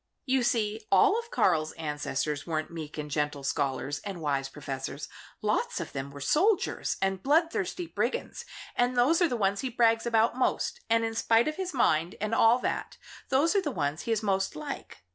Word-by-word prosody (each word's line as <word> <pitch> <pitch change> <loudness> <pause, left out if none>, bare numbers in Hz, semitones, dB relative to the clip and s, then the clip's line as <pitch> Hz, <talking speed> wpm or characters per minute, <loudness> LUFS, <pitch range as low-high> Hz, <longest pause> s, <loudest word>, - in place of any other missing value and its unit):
You 260 -1 +2
see, 220 -2 0
all 420 +2 +5
of 465 0 -8
Karl's 160 - +2
ancestors 150 -1 -3
weren't 155 -1 -2
meek 160 -3 -7
and 150 -1 -5
gentle 150 -1 -1
scholars 135 +1 -1
and 195 -4 -6
wise 140 -3 -1
professors. 135 0 -6 0.4
Lots 210 -2 0
of 170 - -5
them 140 0 -4
were 140 0 -10
soldiers 365 - +1
and 195 -1 0
bloodthirsty 330 - +1
brigands, 470 +8 -3 0.3
and 245 +1 +1
those 300 +9 +4
are 350 - +5
the 245 - -1
ones 200 -1 +1
he 260 - -2
brags 230 -1 +2
about 230 0 +3
most 260 - 0
and 230 0 +3
in 225 - -2
spite 225 +2 +3
of 305 - -2
his 375 -1 -3
mind, 170 - +2
and 215 +2 -2
all 225 +1 +5
that, - - -3 0.3
those 295 +8 +3
are 400 - +4
the 305 - -2
ones 150 - -2
he 230 - -3
is 225 -1 0
most 195 -2 0
like. 290 - -7
215 Hz, 190 wpm, -28 LUFS, -, 0.4 s, all